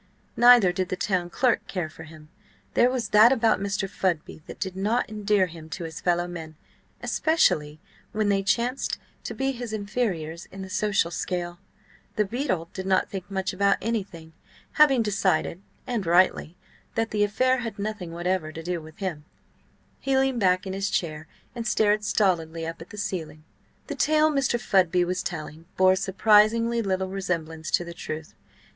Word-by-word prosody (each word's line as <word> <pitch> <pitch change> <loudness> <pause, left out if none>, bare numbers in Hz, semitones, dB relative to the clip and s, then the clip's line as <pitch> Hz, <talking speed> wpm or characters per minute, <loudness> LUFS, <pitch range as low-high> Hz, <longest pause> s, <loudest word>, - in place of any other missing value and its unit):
Neither 240 -6 +7
did 180 0 -2
the - - -1
town 180 -2 -1
clerk 245 +6 +1
care 180 -5 -3
for 160 +1 -12
him. 155 -1 -14 0.4
There 245 - +4
was 255 -2 -2
that 215 +3 +7
about 230 -6 +3
Mr. 195 0 -2
Fudby 175 -5 -2
that - - -9
did 190 -1 -3
not 215 +6 0
endear 210 -2 +1
him 165 -2 -11
to 175 - -6
his 165 0 -7
fellow 175 0 +1
men, 165 -3 -8 0.5
especially 155 - +1 0.3
when 215 -1 0
they 200 -1 +2
chanced 235 +7 0 0.3
to - - -5
be 270 0 0
his 240 -3 -6
inferiors 200 -7 -3
in 195 0 -9
the 190 - -9
social 195 -4 +1
scale. 175 0 -3 0.6
The 210 - +2
beadle 195 - -2
did 190 0 -5
not 190 -1 +2
think 190 -2 -6
much 190 0 -2
about 200 +1 +3
anything. 190 -8 -4 0.4
Having 275 -6 +5
decided 190 -4 0 0.2
(and 235 -5 -2
rightly) 175 -1 +2 0.4
that 225 0 0
the 210 -1 +2
affair 255 +5 +2
had 230 -4 -5
nothing 200 -4 -4
whatever 175 -1 -2
to 165 +1 -8
do 175 0 -3
with 155 0 -13
him, 170 -7 -4 0.7
he 270 -1 +1
leaned 265 -2 +1
back 185 -2 +2
in 190 - -4
his 195 +1 -1
chair 155 -2 -2 0.3
and 235 -1 -5
stared 210 0 +2
stolidly 165 -6 0
up 165 0 -6
at 165 - -10
the 210 - -10
ceiling. 160 -6 -4 0.4
The - - -5
tale 310 0 +3
Mr. 265 -4 +1
Fudby 180 -5 +2
was 180 +1 -2
telling 160 -3 -6
bore 185 0 +5
surprisingly 215 +4 +3
little 190 -2 -1
resemblance 165 -5 -3
to 175 - +1
the 170 - -7
truth. 155 -1 -7
190 Hz, 175 wpm, -25 LUFS, 170-215 Hz, 0.7 s, Neither